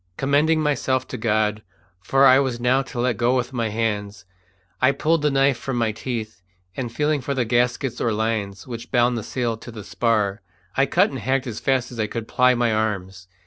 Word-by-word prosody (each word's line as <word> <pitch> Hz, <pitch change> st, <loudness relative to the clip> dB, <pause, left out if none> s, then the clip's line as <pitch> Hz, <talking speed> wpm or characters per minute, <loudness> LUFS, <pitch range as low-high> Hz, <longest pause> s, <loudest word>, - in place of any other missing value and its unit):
Commending 150 Hz, +4 st, +2 dB
myself 130 Hz, -3 st, 0 dB
to -, -, -5 dB
God, 110 Hz, -1 st, 0 dB, 0.4 s
for 135 Hz, +8 st, +3 dB
I 130 Hz, 0 st, +7 dB
was 130 Hz, -4 st, -1 dB
now 125 Hz, +2 st, +2 dB
to 135 Hz, -2 st, -7 dB
let 120 Hz, -1 st, 0 dB
go 120 Hz, +2 st, +2 dB
with 125 Hz, +1 st, -2 dB
my 115 Hz, -3 st, -1 dB
hands, 105 Hz, -3 st, -3 dB, 0.6 s
I 130 Hz, +2 st, +4 dB
pulled 160 Hz, +2 st, +1 dB
the 150 Hz, -, +2 dB
knife 135 Hz, -2 st, +2 dB
from 135 Hz, -2 st, -3 dB
my 115 Hz, -2 st, +1 dB
teeth, 110 Hz, -4 st, -5 dB, 0.3 s
and 125 Hz, -3 st, -4 dB
feeling 150 Hz, +3 st, 0 dB
for 140 Hz, +3 st, -3 dB
the 125 Hz, -2 st, 0 dB
gaskets 120 Hz, +1 st, 0 dB
or 115 Hz, -, +1 dB
lines 105 Hz, -2 st, -2 dB
which 120 Hz, -1 st, -7 dB
bound 120 Hz, -1 st, +2 dB
the 115 Hz, -, -2 dB
sail 115 Hz, 0 st, -2 dB
to 115 Hz, -, -11 dB
the 110 Hz, -3 st, -8 dB
spar, 105 Hz, -2 st, 0 dB, 0.3 s
I 135 Hz, +1 st, +3 dB
cut -, -, +3 dB
and 135 Hz, -, -5 dB
hacked 130 Hz, +4 st, 0 dB
as 115 Hz, -4 st, -5 dB
fast 130 Hz, -2 st, 0 dB
as 120 Hz, -, -9 dB
I 110 Hz, -, 0 dB
could 115 Hz, 0 st, -5 dB
ply 125 Hz, 0 st, +3 dB
my 120 Hz, -2 st, +1 dB
arms. 95 Hz, -4 st, -2 dB
120 Hz, 210 wpm, -22 LUFS, 110-130 Hz, 0.6 s, I